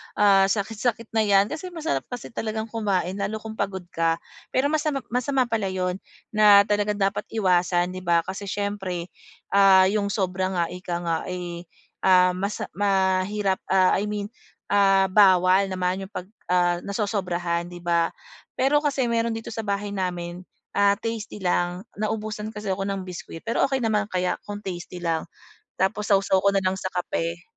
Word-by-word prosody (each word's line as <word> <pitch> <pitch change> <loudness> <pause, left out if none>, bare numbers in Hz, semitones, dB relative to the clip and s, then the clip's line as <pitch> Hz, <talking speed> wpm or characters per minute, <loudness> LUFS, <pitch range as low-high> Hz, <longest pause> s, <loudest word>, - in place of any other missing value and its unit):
ah, 195 -2 +5
sakit-sakit 225 +3 -2
na 220 -1 +2
'yan 200 +1 +4
kasi 320 +4 -5
masarap 325 -2 -3
kasi 245 -2 -7
talagang 220 0 -4
kumain 200 -4 -1
lalo 205 +2 -2
kung 220 0 -8
pagod 195 -2 -2
ka. 165 0 +1 0.3
Pero 280 +3 +1
masama 300 -3 0
masama 255 +2 +1
pala 225 -5 -1
yun 185 0 -2 0.3
na 210 -2 +7
talagang 205 0 0
dapat 195 0 0
iwasan 180 -3 +2
'di 185 - -6
ba, 170 -2 +2
kasi 200 +1 -6
siyempre, 190 -3 -3 0.4
ah, 195 -1 +7
yung 210 -1 0
sobra 190 -2 -1
nga 170 - +2
ika 180 -1 -5
nga, 165 -1 0
eh, 175 -1 -6 0.3
ah, 180 -1 +5
mas 200 +3 -3 0.2
mahirap 195 0 +1
ah, 190 -1 +4
I 210 - -2
mean, 205 +1 -4 0.4
ah, 195 -1 +5
bawal 190 -1 +5
naman 185 +1 -2
yung - - -32
pag, 180 - -5 0.2
ah, 175 -1 +3
nasosobrahan 180 -5 -2
'di 175 -1 -10
ba, 170 -1 +2 0.5
pero 280 +3 +3
kasi 275 -4 0
meron 230 -1 0
dito 225 0 -6
sa 225 - -3
bahay 200 0 -2
namin, 180 -2 -3 0.3
ah, 200 0 +3
tasty 225 -1 -5
lang 175 0 0 0.2
naubusan 215 0 -3
kasi 210 -2 -3
ako 195 +1 -2
ng 195 -1 -3
biskwit 175 -2 -8
pero 230 +4 +1
okey 270 -3 -1
naman 210 -2 +1
kaya 180 -2 -1
kung 205 0 -6
tasty 175 -1 -6
lang, 165 0 -1 0.5
tapos 210 +3 0
saw-saw 195 -1 +4
ko 200 - +5
nalang 190 -1 +1
sa 185 -1 -4
kape. 170 -1 -3
195 Hz, 165 wpm, -24 LUFS, 180-210 Hz, 0.5 s, na